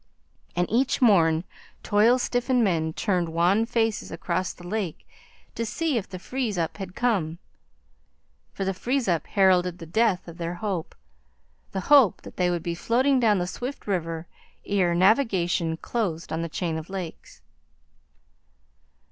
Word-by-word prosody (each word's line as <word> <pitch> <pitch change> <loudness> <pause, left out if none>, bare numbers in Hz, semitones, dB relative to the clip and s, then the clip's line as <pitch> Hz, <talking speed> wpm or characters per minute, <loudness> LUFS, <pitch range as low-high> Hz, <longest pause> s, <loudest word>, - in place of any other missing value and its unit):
And 175 0 +1
each 255 +4 +2
morn, 170 -9 +4 0.4
toil 220 +4 +4
stiffened 245 0 +1
men 165 -5 +1
turned 180 -1 0
wan 180 +7 +2
faces 225 -2 0
across 175 +1 -2
the 175 - -14
lake 190 -3 -4 0.5
to 230 - -3
see 275 +7 -1
if 215 -4 -2
the 185 - -6
freeze 230 +1 -3
up 165 -2 -2
had 190 -3 -7
come. 190 -10 0 1.1
For 195 - -4
the 195 - 0
freeze 250 +6 -1
up 170 -3 0
heralded 180 -3 +3
the 165 - -9
death 195 +2 +1
of 170 0 -10
their 170 +1 -3
hope 185 -3 -4 0.8
the 190 - -3
hope 270 -1 +5
that - - -12
they 180 -1 +2
would 175 -2 -2
be 170 - -2
floating 255 +9 +2
down 220 -4 +3
the 175 - 0
swift 250 +9 -6
river 165 -4 -2 0.4
ere 185 -4 +1
navigation 180 -5 +2
closed 170 -7 -3
on 160 - -1
the 165 - -3
chain 160 0 -2
of 160 - -10
lakes. 185 -4 -7
190 Hz, 155 wpm, -25 LUFS, 170-225 Hz, 1.1 s, hope